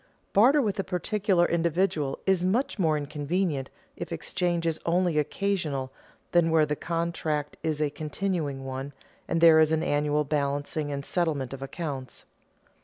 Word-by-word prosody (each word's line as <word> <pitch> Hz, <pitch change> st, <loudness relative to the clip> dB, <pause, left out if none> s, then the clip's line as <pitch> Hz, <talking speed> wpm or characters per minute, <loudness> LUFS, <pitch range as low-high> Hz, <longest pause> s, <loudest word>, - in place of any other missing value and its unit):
Barter 260 Hz, +8 st, +5 dB
with 205 Hz, -3 st, -1 dB
a -, -, +1 dB
particular 190 Hz, 0 st, +1 dB
individual 170 Hz, -4 st, 0 dB
is 190 Hz, -2 st, +2 dB
much 215 Hz, +6 st, 0 dB
more 160 Hz, -4 st, +3 dB
inconvenient 150 Hz, 0 st, -2 dB, 0.3 s
if -, -, -7 dB
exchange 175 Hz, -2 st, -1 dB
is 160 Hz, -1 st, 0 dB
only 175 Hz, -2 st, +2 dB
occasional 150 Hz, -5 st, -1 dB, 0.4 s
than 170 Hz, -1 st, +4 dB
where 160 Hz, -1 st, +4 dB
the 150 Hz, 0 st, -1 dB
contract 165 Hz, -3 st, -2 dB
is 155 Hz, -2 st, -1 dB
a 150 Hz, -2 st, +1 dB
continuing 150 Hz, -2 st, -3 dB
one, 135 Hz, +2 st, -5 dB, 0.3 s
and 165 Hz, -, 0 dB
there 165 Hz, -1 st, +8 dB
is 155 Hz, 0 st, +4 dB
an 160 Hz, 0 st, +1 dB
annual 150 Hz, +1 st, +1 dB
balancing 145 Hz, +1 st, -1 dB
and 140 Hz, -1 st, -4 dB
settlement 150 Hz, -7 st, -1 dB
of 135 Hz, -, -8 dB
accounts. 135 Hz, -2 st, -6 dB
160 Hz, 150 wpm, -27 LUFS, 145-175 Hz, 0.4 s, there